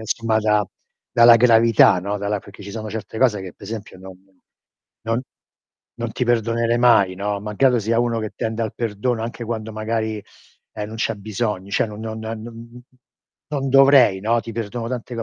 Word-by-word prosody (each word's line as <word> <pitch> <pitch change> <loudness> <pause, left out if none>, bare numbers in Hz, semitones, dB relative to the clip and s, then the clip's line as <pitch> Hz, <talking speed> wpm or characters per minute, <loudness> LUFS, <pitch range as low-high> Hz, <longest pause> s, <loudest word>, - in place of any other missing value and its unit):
insomma 110 0 0
da 105 -2 +1 0.5
dalla 120 0 +7
gravità, 115 -5 +5
no, 100 +3 -3
dalla 100 0 -2
perché 100 - -14
ci 100 - -8
sono 110 -1 -6
certe 110 0 -6
cose 115 -6 +2
che 95 -2 -8
pe' - - -23
esempio 105 -3 -7
non 95 0 -11
non 95 - -31 0.7
non 115 +2 -1 0.8
non 115 -1 -3
ti 125 - -1
perdonerei 115 0 +1
mai, 115 -6 +4
no, 100 +1 -3
malgrado 120 +5 +2
sia 115 +1 0
uno 120 -1 0
che 110 -1 -5
tende 110 0 -2
al 110 - -4
perdono, 115 +1 -2
anche 120 +1 -5
quando 110 -1 -5
magari, 110 -1 -3 0.5
ehm, 105 -1 -5
non 110 - -8
c'è 115 0 -1
bisogno, 105 -1 -4
cioè - - +1
non 105 -1 -9
non 110 0 -5
nan 110 0 -6
nun 120 +1 -9
mh - - -11 0.2
mhmm, 125 - -11 0.7
non 135 -2 -1
dovrei, 135 -6 +6
no, 115 +3 +1
ti 115 - -8
perdono 115 +1 -4
tante 125 0 -5
co 115 - -3
110 Hz, 195 wpm, -21 LUFS, 105-115 Hz, 0.8 s, dalla